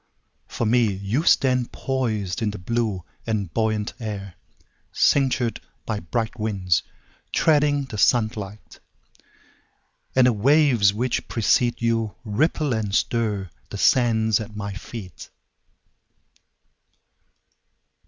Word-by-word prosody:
For 120 Hz, -, -3 dB
me, 115 Hz, -1 st, +3 dB
You 100 Hz, +8 st, -1 dB
stand 125 Hz, -6 st, +3 dB
poisedIn 110 Hz, -5 st, -2 dB
the -, -, -6 dB
blue 105 Hz, -1 st, -2 dB, 0.2 s
and 105 Hz, -6 st, -2 dB
buoyant 110 Hz, -2 st, 0 dB
air, 100 Hz, -4 st, -5 dB, 0.6 s
Cinctured 130 Hz, -4 st, +2 dB, 0.3 s
by 110 Hz, -2 st, -2 dB
bright 110 Hz, +6 st, -3 dB
winds, 95 Hz, -6 st, +1 dB, 0.5 s
Treading 145 Hz, -2 st, +3 dB
the 115 Hz, -6 st, -7 dB
sunlight. 110 Hz, -4 st, 0 dB, 1.4 s
And 130 Hz, -1 st, +6 dB
the 125 Hz, -, +4 dB
waves 125 Hz, -3 st, +4 dB
which 120 Hz, +5 st, -2 dB
precede 120 Hz, +1 st, +2 dB
youRipple 115 Hz, +5 st, 0 dB
and 110 Hz, -2 st, -2 dB
stirThe 105 Hz, -6 st, -2 dB
sands 110 Hz, -4 st, +3 dB
at 110 Hz, -1 st, -8 dB
my 100 Hz, -1 st, -4 dB
feet. 95 Hz, -2 st, -9 dB
110 Hz, 95 wpm, -23 LUFS, 105-125 Hz, 1.4 s, And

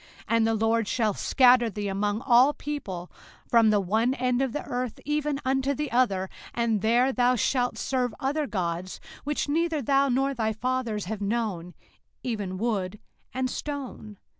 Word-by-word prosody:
05:028:064 -, -, -23 dB
And 225 Hz, -1 st, +3 dB
the 225 Hz, -, +2 dB
LORD 225 Hz, 0 st, +1 dB
shall 220 Hz, -3 st, +1 dB
scatter 250 Hz, +1 st, +4 dB
thee 210 Hz, -1 st, -4 dB
among 205 Hz, +2 st, -1 dB
all 255 Hz, +3 st, +5 dB
people, 195 Hz, -14 st, -6 dB, 0.4 s
from 230 Hz, -2 st, +5 dB
the 210 Hz, -1 st, +4 dB
one 220 Hz, +7 st, +1 dB
end 250 Hz, 0 st, 0 dB
of 265 Hz, -2 st, 0 dB
the 295 Hz, -, -4 dB
earth 245 Hz, -2 st, -4 dB
even 295 Hz, -1 st, -1 dB
unto 270 Hz, +1 st, +1 dB
the 300 Hz, +1 st, -3 dB
other; 200 Hz, -6 st, +2 dB, 0.3 s
and 230 Hz, -3 st, +1 dB
there 240 Hz, +4 st, +3 dB
thou 250 Hz, 0 st, +3 dB
shalt 245 Hz, +2 st, 0 dB
serve 255 Hz, -2 st, -1 dB
other 290 Hz, +2 st, -1 dB
gods, 180 Hz, -3 st, -3 dB, 0.3 s
which 295 Hz, 0 st, -1 dB
neither 325 Hz, +1 st, +1 dB
thou 275 Hz, +1 st, +2 dB
nor 270 Hz, +2 st, +1 dB
thy 220 Hz, -3 st, -1 dB
fathers 235 Hz, -3 st, -2 dB
have 210 Hz, +2 st, -5 dB
known, 200 Hz, -5 st, -2 dB, 0.5 s
even 205 Hz, -6 st, -3 dB
wood 205 Hz, -3 st, -1 dB, 0.3 s
and 260 Hz, 0 st, -1 dB
stone. 255 Hz, -7 st, -6 dB
240 Hz, 165 wpm, -26 LUFS, 210-265 Hz, 0.5 s, all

